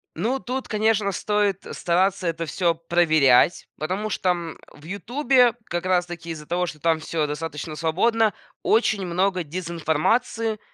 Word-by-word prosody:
Ну 235 +11 -1
тут, 255 +1 -4
конечно, 215 -2 +1
стоит 205 -1 0
стараться 185 +2 +1
это 165 0 -2
всё 170 +3 0
проверять, 160 -4 +3
потому 190 +7 -2
что, 185 - -1
м, 170 -2 -2
в 145 - -18
"Ютубе", 245 - +2
как 175 +1 -3
раз 180 -1 +2
таки 170 -1 -7
из-за 150 -2 -7
того, 180 +2 0
что 155 -3 -7
там 165 0 +2
всё 155 -1 -2
достаточно 150 0 -5
свободно, 210 +7 +2 0.3
очень 220 -4 +2
много 185 +1 0
дезинформации. 180 +7 -1
175 Hz, 145 wpm, -23 LUFS, 165-210 Hz, 0.3 s, проверять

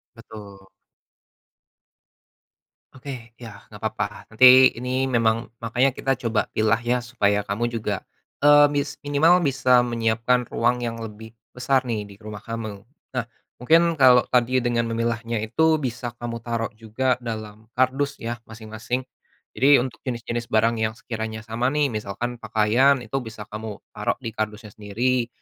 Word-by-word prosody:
Betul. 100 -4 -12 2.3
Oke, 125 -3 -9
iya, 115 -5 -11
enggak - - -13
papa. - - -3
Nanti, 130 +3 +8
ini 125 +2 -2
memang, 115 0 +1
makanya 125 +3 +1
kita 135 +1 -1
coba 115 -3 -1
pilah 110 0 +2
ya 120 0 -1
supaya 105 -4 0
kamu 115 +4 -2
juga, 110 -4 -3 0.4
eee, 145 0 +7
mis 145 0 -2
minimal 160 +5 +4
bisa 130 -3 +3
menyiapkan 120 +1 0
ruang 120 +1 0
yang 115 -1 -3
lebih 110 +1 -10 0.2
besar 130 +2 +1
nih 110 -4 -3
di 100 - -13
rumah 105 0 -9
kamu. 110 -2 -6 0.4
Nah, 120 - 0 0.3
mungkin 165 +5 +3
kalau 125 -2 +7
tadi 125 0 +2
dengan 120 -1 0
memilahnya 115 -1 -2
itu 160 +8 +2
bisa 120 -1 -4
kamu 120 -1 -5
taruh 115 0 -3
juga 125 +3 -1
dalam 110 -2 -7
kardus 135 +3 +1
ya, 120 0 -4
masing-masing. 110 +3 -5 0.5
Jadi, 140 -1 +4
untuk 130 - -7
jenis-jenis 120 -1 -3
barang 110 +1 +2
yang 110 0 0
sekiranya 110 -2 -6
sama 115 +3 -1
nih. 145 -1 +1
Misalkan 110 +3 -4
pakaian 120 +6 +2
itu 135 - -3
bisa 110 -4 -8
kamu 105 -1 -7
taruh - - -2
di 115 - -4
kardusnya 110 0 -5
sendiri 115 +5 -1
115 Hz, 145 wpm, -23 LUFS, 110-125 Hz, 2.3 s, Nanti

